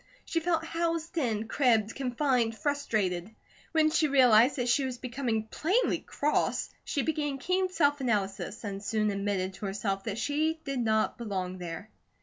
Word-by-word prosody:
She 330 - 0
felt 330 -1 0
housed 330 0 -2
in, 225 -5 -1
cribbed, 225 -5 +2
confined, 250 -3 0
frustrated. 210 -9 -1 0.4
When 315 -1 +3
she 315 -1 +3
realized 255 -2 +6
that 250 -3 -1
she 270 +3 +3
was 260 -2 -3
becoming 240 -3 -2
plainly 360 - +1
cross, 300 +1 -1
she 280 - -1
began 295 -3 -1
keen 370 +6 0
self 290 -5 +2
analysis 210 -2 -1
and 200 -1 -5
soon 215 0 +1
admitted 195 -1 -1
to 200 +2 -5
herself 195 0 -2
that 215 -2 -3
she 305 +6 0
did 275 -2 -2
not 220 -1 +1
belong 185 -5 -3
there. 175 +4 -7
245 Hz, 155 wpm, -29 LUFS, 210-295 Hz, 0.4 s, realized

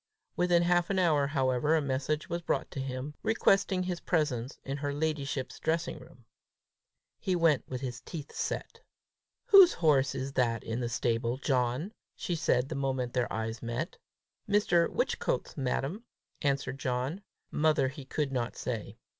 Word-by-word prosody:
Within 175 -1 +3
half 175 0 +2
an 195 - 0
hour, 155 -6 +3
however, 135 +1 +2
a - - +4
message 140 +2 -1
was 170 0 -3
brought - - -1
him, 135 +1 -4
requesting 195 -4 +2
his 180 -1 -3
presence 145 -6 -1
in 135 +1 -3
her 145 0 -2
ladyship's 145 -3 -2
dressing 165 +1 -1
room. 120 -2 -16 0.9
He 185 - 0
went 165 -5 +2
with 125 -1 -4
his 125 -2 -5
teeth 150 +2 -8
set. - - -3 0.7
"Whose 395 -6 +9
horse 145 -5 +3
is 135 +1 -3
that 115 -4 +1
in 115 +2 -3
the 120 -1 -2
stable, 120 +1 0
John?" 130 - 0 0.2
she 175 - -3
said, 145 -6 +1
the - - -3
moment 130 -3 -1
their 125 -2 0
eyes 110 +1 -3
met. 120 +8 -4 0.5
"Mr. 180 -5 +3
Whichcote's, - - -1
madam," 140 - -2 0.4
answered 135 -2 -1
John: 130 +8 -2 0.3
mother 150 -3 +2
he 135 +1 -9
could 140 +1 -2
not 120 -3 -2
say. 115 -4 -4
140 Hz, 155 wpm, -30 LUFS, 125-165 Hz, 0.9 s, Whose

